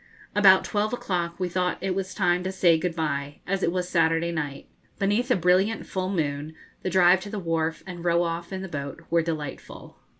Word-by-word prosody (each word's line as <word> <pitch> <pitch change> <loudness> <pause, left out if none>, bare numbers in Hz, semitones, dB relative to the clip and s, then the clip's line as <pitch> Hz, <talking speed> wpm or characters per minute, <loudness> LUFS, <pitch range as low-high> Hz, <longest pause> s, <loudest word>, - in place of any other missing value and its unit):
About 195 -2 +7
twelve 210 +1 -1
o'clock 175 -7 -2
we 185 - 0
thought 180 0 -1
it 190 0 -1
was 185 -1 -4
time 180 -2 +2
to 190 - -2
say 180 -3 +4
good 175 0 -2
bye, 145 -3 -2
as 195 +1 -1
it 170 - +1
was 180 0 -2
Saturday 165 -1 +2
night. 145 -4 -4 0.3
Beneath 205 +6 +1
a 250 - +4
brilliant 185 +5 +2
full 185 -1 -3
moon 155 -4 -2 0.3
the 185 - -2
drive 180 0 +5
to 205 - -7
the 210 - -5
wharf 165 -3 -1
and 175 -2 -8
row 170 0 +3
off 170 +1 -4
in 190 0 -4
the - - -5
boat 140 -2 -6
were 170 0 +4
delightful. 155 -4 -6
175 Hz, 205 wpm, -26 LUFS, 165-190 Hz, 0.3 s, About